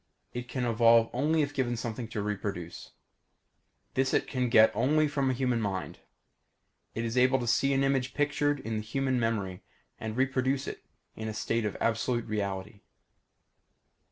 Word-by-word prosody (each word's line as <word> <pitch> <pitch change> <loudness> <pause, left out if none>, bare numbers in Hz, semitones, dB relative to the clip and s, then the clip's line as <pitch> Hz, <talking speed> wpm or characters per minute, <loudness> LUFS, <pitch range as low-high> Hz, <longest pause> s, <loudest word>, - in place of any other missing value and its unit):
It 120 0 -5
can 125 -2 -2
evolve 115 0 +4
only 150 +5 +2
if 145 0 -3
given 120 -4 -1
something 115 0 -4
to 110 -2 -4
reproduce. 100 -4 -5 1.0
This 135 0 +1
it - - +2
can 125 -2 -1
get 110 -1 +6
only 150 +6 +3
from 140 -2 0
a - - +2
human 125 -2 0
mind. 95 -3 -3 1.0
It 115 - -2
is 115 +2 0
able 130 +1 +4
to 125 - -3
see 120 +4 +2
an 135 0 +2
image 135 -2 0
pictured 145 0 +1
in 110 0 -3
the - - -2
human 130 +3 -1
memory 100 -6 -1 0.4
and 110 +1 -5
reproduce 135 +1 +1
it - - -7 0.3
in 110 - -5
a 110 - -4
state 115 +1 -1
of 105 - -3
absolute 120 +1 0
reality. 100 -1 -3
120 Hz, 165 wpm, -29 LUFS, 110-135 Hz, 1.0 s, get